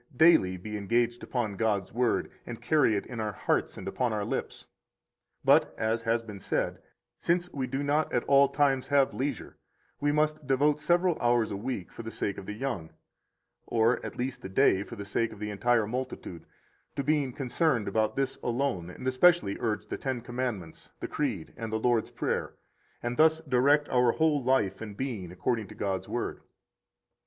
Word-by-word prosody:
daily 95 - +5
be 105 +4 -5
engaged 120 +4 0
upon 115 -5 -2
God's 105 -2 0
Word, 120 +1 +1
and 115 -2 -7
carry 150 -8 +3
it 100 - -2
in 120 -3 -7
our 105 -1 -2
hearts - - -1
and - - -7
upon 125 -2 0
our 105 -1 -1
lips. - - -4 0.8
But - - +4
(as 110 +1 0
has 115 0 0
been 105 -3 -9
said) - - -1 0.4
since 175 +1 0
we 130 -2 -2
do 135 +3 -2
not 150 +2 +1
at 120 - +1
all 140 0 +5
times 140 -2 +2
have 140 -2 +3
leisure, 135 -2 -4 0.4
we 145 0 +2
must 155 -1 0
devote 145 +2 +3
several 175 +1 +2
hours 120 -2 +2
a - - -2
week 105 -3 -4
for - - -8
the 115 - -6
sake 100 -3 -3
of 95 - -10
the 105 - -4
young, 105 -8 -4 0.8
or 115 +1 +2
at - - -6
least 125 +1 -3
a 95 - -5
day 95 0 +4
for 115 - -7
the 100 -2 -7
sake 115 +3 0
of 110 - -10
the 105 +1 -4
entire 115 +2 +2
multitude, 110 -8 -5 0.5
to 140 - -1
being 145 -2 +1
concerned 130 -2 0
about 110 +2 +1
this 135 -1 -1
alone, 120 -8 -1
and 130 +8 -7
especially 130 - +4
urge 110 -3 -1
the - - -5
Ten 130 -3 -2
Commandments, 120 -9 -5
the - - -4
Creed, 115 - -3
and 115 -2 -5
the 110 - 0
Lord's 115 0 +1
Prayer, - - -2 0.5
and 120 0 -2
thus 160 0 +5
direct 145 +1 +3
our 125 -2 +3
whole 155 -4 +2
life 110 -7 +1
and 105 -2 -7
being 110 -10 -4
according 110 +4 -1
to - - -12
God's 95 -2 -2
Word. - - -3
120 Hz, 185 wpm, -29 LUFS, 105-140 Hz, 0.8 s, daily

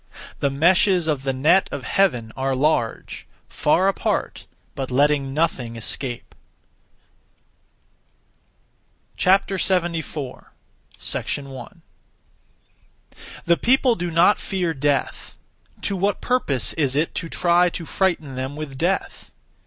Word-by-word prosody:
The 140 - +1
meshes 175 +5 +3
of 150 -4 0
the 135 0 -1
net 150 +9 +3
of - - -5
Heaven 125 - +1
are 135 0 -1
large; 130 -4 -1 0.2
far 180 +5 +2
apart, 195 - -2 0.3
but 135 -2 -5
letting 140 +1 +2
nothing 135 -6 -1
escape. 120 +2 -4 2.8
74. 175 -7 0 0.5
1. 135 -3 -4 1.6
The 170 0 +3
people 255 0 +3
do 175 -4 -3
not 170 +5 +4
fear 180 -4 -2
death; 145 0 -2 0.4
to 200 - -2
what 200 +2 0
purpose 150 - 0
is 140 -5 0
it 155 +3 0
to 165 - -4
(try 175 +1 +3
to) 170 -1 -6
frighten 165 -6 -1
them 130 +2 -4
with 145 -3 -7
death? 180 +3 -2
155 Hz, 105 wpm, -22 LUFS, 135-180 Hz, 2.8 s, not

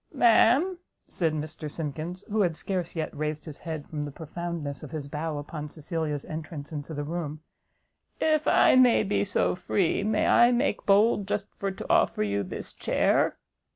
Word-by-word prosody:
"Ma'am," 260 +9 +4 0.3
said 165 -3 -1
Mr 155 0 -5
Simkins, 160 +4 -5
who 215 0 +2
had 170 -4 +1
scarce 180 -3 -3
yet 160 -1 -3
raised 150 +1 -3
his 155 -3 -7
head 160 -3 -5
from 150 -2 -4
the 145 - -4
profoundness 160 -1 -5
of - - -8
his 155 -3 -5
bow 150 +1 -3
upon 150 +1 -6
Cecilia's 155 -2 -3
entrance 155 -2 -6
into 150 +1 -6
the 145 - -3
room, 155 -1 -4 0.8
"if 310 -1 +2
I - - +6
may 250 -3 +6
be 205 0 +1
so 200 - +1
free, 185 0 0
may 215 +1 +1
I 240 +1 +6
make 245 -3 0
bold 205 0 +4
just 205 0 -3
for 200 - -3
to 190 - -7
offer - - +3
you 100 -1 0
this 95 - -6
chair?" - - +1
165 Hz, 175 wpm, -27 LUFS, 150-200 Hz, 0.8 s, I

